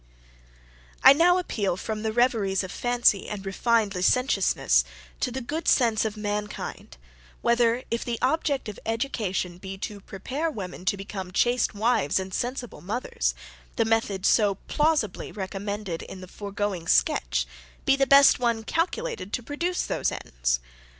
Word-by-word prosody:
I 265 Hz, -, +10 dB
now 350 Hz, +4 st, +4 dB
appeal 205 Hz, -, -1 dB
from 215 Hz, +2 st, -4 dB
the 220 Hz, 0 st, -1 dB
reveries 215 Hz, -5 st, +2 dB
of 185 Hz, -, -6 dB
fancy 240 Hz, -4 st, +2 dB
and 200 Hz, -2 st, -6 dB
refined 215 Hz, +1 st, +1 dB
licentiousness 185 Hz, -, +2 dB, 0.4 s
to -, -, 0 dB
the 265 Hz, +2 st, -4 dB
good 305 Hz, +7 st, -4 dB
sense 230 Hz, -4 st, +3 dB
of 215 Hz, -1 st, -3 dB
mankind, 210 Hz, -, -5 dB, 0.5 s
whether, 235 Hz, +1 st, +3 dB
if 230 Hz, -, -1 dB
the 235 Hz, -1 st, -3 dB
object 280 Hz, 0 st, 0 dB
of 210 Hz, -, -7 dB
education 215 Hz, -7 st, -2 dB
be 195 Hz, 0 st, -7 dB
to 200 Hz, +1 st, -6 dB
prepare 265 Hz, -, -3 dB
women 185 Hz, -, -7 dB
to 200 Hz, 0 st, +1 dB
become 195 Hz, -1 st, -6 dB
chaste 240 Hz, +3 st, +1 dB
wives 215 Hz, -8 st, +2 dB
and 190 Hz, 0 st, -6 dB
sensible 245 Hz, -, -4 dB
mothers, 215 Hz, +9 st, -2 dB, 0.4 s
the 225 Hz, -, +2 dB
method 220 Hz, -4 st, 0 dB
so 205 Hz, -3 st, +4 dB
plausibly 300 Hz, -, 0 dB
recommended 200 Hz, -2 st, -4 dB
in 190 Hz, -, -9 dB
the 185 Hz, -, -10 dB
foregoing 200 Hz, -3 st, -4 dB
sketch, -, -, +2 dB, 0.4 s
be 270 Hz, -, +5 dB
the 270 Hz, 0 st, +2 dB, 0.3 s
one 235 Hz, -2 st, +1 dB
best -, -, -24 dB
calculated 365 Hz, -, -1 dB
to 245 Hz, -, -2 dB
produce 340 Hz, +7 st, -2 dB
those -, -, -1 dB
ends? -, -, -1 dB
215 Hz, 150 wpm, -26 LUFS, 195-250 Hz, 0.5 s, I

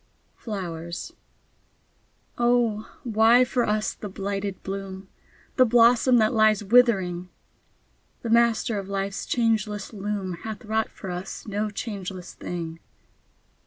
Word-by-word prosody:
FLOWERS 170 Hz, -6 st, -6 dB, 1.2 s
Oh, 240 Hz, -3 st, +1 dB
why 230 Hz, +2 st, +5 dB
for 245 Hz, -1 st, 0 dB
us 215 Hz, 0 st, 0 dB
the 210 Hz, -, -8 dB
blighted 195 Hz, 0 st, -4 dB
bloom! 190 Hz, 0 st, -6 dB, 0.5 s
The 255 Hz, -, +7 dB
blossom 240 Hz, +1 st, +5 dB
that 215 Hz, 0 st, +3 dB
lies 215 Hz, -2 st, +4 dB
withering! 190 Hz, -6 st, +3 dB, 0.9 s
The 230 Hz, -, -2 dB
Master 230 Hz, -2 st, +3 dB
of 195 Hz, 0 st, -7 dB
Life's 195 Hz, 0 st, -3 dB
changeless 220 Hz, -3 st, 0 dB
loom 200 Hz, -3 st, -3 dB
Hath 220 Hz, +1 st, -7 dB
wrought 220 Hz, +1 st, 0 dB
for 190 Hz, -, -8 dB
us 180 Hz, +2 st, -6 dB
no 210 Hz, +1 st, -1 dB
changeless 195 Hz, -4 st, -6 dB
thing. 165 Hz, -2 st, -6 dB
210 Hz, 115 wpm, -25 LUFS, 190-230 Hz, 1.2 s, The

